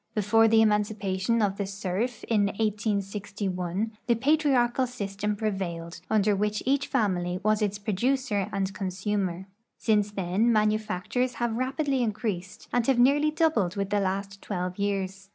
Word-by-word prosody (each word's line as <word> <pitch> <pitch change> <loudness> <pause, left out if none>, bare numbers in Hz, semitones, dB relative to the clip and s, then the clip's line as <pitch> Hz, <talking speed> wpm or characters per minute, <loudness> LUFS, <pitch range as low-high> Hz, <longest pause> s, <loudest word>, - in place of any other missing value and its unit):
Before 225 +2 +4
the 225 0 +5
emancipation 210 0 +1
of 200 -1 0
the 200 - -2
serf, 200 +4 -3
in 210 -3 +2
1861, 200 -2 -2 0.2
the 235 - +4
])atriarchal 265 -2 +2
system 210 -3 -3
prevailed, 175 -6 -4
under 210 -1 +3
which 210 +1 -1
each 280 +2 +1
family 180 -4 0
was 215 +1 +2
its 205 -1 0
))roducerand 205 -2 -1
consumer. 190 -1 -2 0.3
Since 210 -2 +1
then 195 +5 +1
manufactures 215 +3 0
have 240 -1 -1
rapidly 265 +2 0
increased 210 -5 -3
and 245 -1 +1
have 265 -2 +3
nearly 280 +5 +4
doubled 305 - +1
the 200 0 0
last 195 0 -2
twelve 180 -1 -4
years. 195 -1 -2
210 Hz, 135 wpm, -27 LUFS, 195-230 Hz, 0.3 s, the